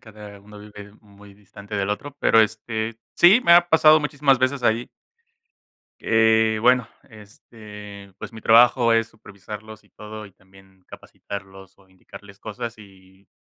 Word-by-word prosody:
cada 105 Hz, -2 st, -14 dB
uno 105 Hz, 0 st, -15 dB
vive 105 Hz, -1 st, -13 dB
muy 100 Hz, -1 st, -19 dB
distante 100 Hz, +1 st, -13 dB
del 100 Hz, 0 st, -2 dB
otro, 140 Hz, +7 st, -5 dB
pero, 115 Hz, -, +4 dB
este, 110 Hz, +1 st, -3 dB, 0.2 s
sí, 195 Hz, +8 st, +5 dB
me 170 Hz, -, +4 dB
ha 175 Hz, 0 st, +6 dB
pasado 155 Hz, -1 st, +5 dB
muchísimas 140 Hz, -3 st, 0 dB
veces 130 Hz, 0 st, -1 dB
ahí. 115 Hz, +1 st, 0 dB, 1.1 s
Eh, 110 Hz, -1 st, +2 dB
bueno, 125 Hz, -1 st, +2 dB, 0.2 s
este, 105 Hz, -2 st, -14 dB
pues -, -, -10 dB
mi 110 Hz, -, -11 dB
trabajo 115 Hz, +1 st, +4 dB
es 115 Hz, 0 st, 0 dB
supervisarlos 105 Hz, 0 st, -13 dB
y 105 Hz, -, -29 dB
todo 105 Hz, +1 st, -11 dB
y 100 Hz, -, -19 dB
también 95 Hz, 0 st, -24 dB
capacitarlos 95 Hz, -1 st, -12 dB
o 95 Hz, -1 st, -26 dB
indicarles 100 Hz, +2 st, -16 dB
cosas 115 Hz, +2 st, -8 dB
y, 95 Hz, -1 st, -20 dB
105 Hz, 150 wpm, -21 LUFS, 100-115 Hz, 1.1 s, ha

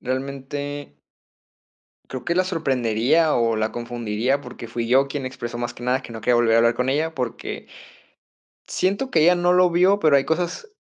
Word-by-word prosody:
realmente 140 Hz, -, -5 dB, 1.1 s
creo 130 Hz, -2 st, -7 dB
que 170 Hz, -, 0 dB
la 185 Hz, +1 st, +2 dB
sorprendería 135 Hz, -, +1 dB
o 115 Hz, -2 st, +1 dB
la 110 Hz, 0 st, -1 dB
confundiría, 120 Hz, +2 st, -2 dB
porque 120 Hz, -, -9 dB
fui 115 Hz, 0 st, -3 dB
yo 135 Hz, +3 st, +4 dB
quien 140 Hz, -1 st, -4 dB
expresó 120 Hz, -2 st, -6 dB
más 120 Hz, 0 st, -4 dB
que -, -, -12 dB
nada 130 Hz, +2 st, 0 dB
que 115 Hz, -, -10 dB
no 115 Hz, -, -7 dB
quería 120 Hz, +2 st, +2 dB
volver 120 Hz, -1 st, +3 dB
a -, -, +5 dB
hablar 115 Hz, 0 st, +4 dB
con 125 Hz, +1 st, -1 dB
ella, 155 Hz, +4 st, 0 dB
porque 125 Hz, -5 st, -5 dB, 1.0 s
siento 200 Hz, +8 st, -1 dB
que 160 Hz, -, +3 dB
ella 175 Hz, +3 st, +6 dB
no 175 Hz, 0 st, +2 dB
lo 180 Hz, 0 st, +4 dB
vio, 185 Hz, +4 st, +4 dB
pero 155 Hz, -6 st, +4 dB
hay 135 Hz, -, +2 dB
cosas 180 Hz, -, -2 dB
135 Hz, 190 wpm, -22 LUFS, 120-160 Hz, 1.1 s, ella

